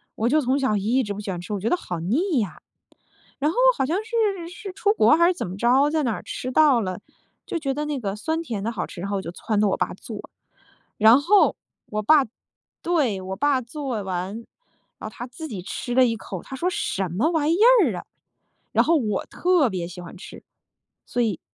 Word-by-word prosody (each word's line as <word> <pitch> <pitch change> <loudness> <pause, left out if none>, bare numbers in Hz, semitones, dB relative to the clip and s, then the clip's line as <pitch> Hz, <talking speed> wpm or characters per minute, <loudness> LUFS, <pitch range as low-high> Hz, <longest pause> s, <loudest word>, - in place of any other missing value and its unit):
我 230 +2 0
就 310 +3 +3
从 260 +1 +1
小 260 -6 +1
一 235 +6 +1
直 205 - -4
不 200 - -7
喜 205 -1 -6
欢 180 -2 -3
吃， 180 +4 -6
我 200 - -2
觉 220 - -1
得 - - +3
好 175 - -5
腻 275 - +1
呀。 185 -8 -4 0.8
然 300 +3 +1
后 - - -8 0.2
好 265 - +1
像 330 +6 0
是 425 -7 0
是 390 +2 -8
出 405 +2 +1
国 310 - +5
还 340 - +5
是 365 - +3
怎 355 - -4
么 185 - -7
着， 260 +6 +4
在 310 -1 0
哪 230 -4 -1
吃 255 - -5
到 290 -4 +5
了， 185 -3 -3 0.5
就 - - -3
觉 275 -3 -1
得 295 - -3
那 295 -3 -2
个 200 -3 -3
酸 320 +9 -2
甜 225 -11 -4
的 230 - -1
好 200 - -3
吃， 175 - -9
然 200 - -4
后 200 - -1
我 - - -3
就 170 - -7
撺 210 +3 -2
掇 210 - +3
我 - - +1
爸 - - -1
做。 - - -9 0.7
然 220 +4 +7
后 400 +6 +4 0.3
我 215 0 -2
爸 285 +5 +5 0.6
对， 285 - +1
我 190 +1 -5
爸 285 0 +2
做 250 -3 -4
完， 190 +4 -4 0.5
啊， 215 - -6
他 235 - -7
自 315 +6 -8
己 205 -10 -6
吃 245 +5 -5
了 260 - +6
一 230 -2 0
口， 190 -4 -7
他 265 - -8
说： 345 +7 0
“什 195 - -2
么 225 - +1
玩 315 -1 +1
意 340 - +2 0.3
儿 235 - 0
啊。” - - -8 0.7
然 - - +3
后 335 - +4
我 210 -8 -1
特 350 -7 +2
别 175 -2 -3
喜 180 0 -10
欢 175 +2 -10
吃。 - - -11 0.6
所 245 - -1
以 215 -7 0
245 Hz, 245 characters per minute, -24 LUFS, 200-310 Hz, 0.8 s, 然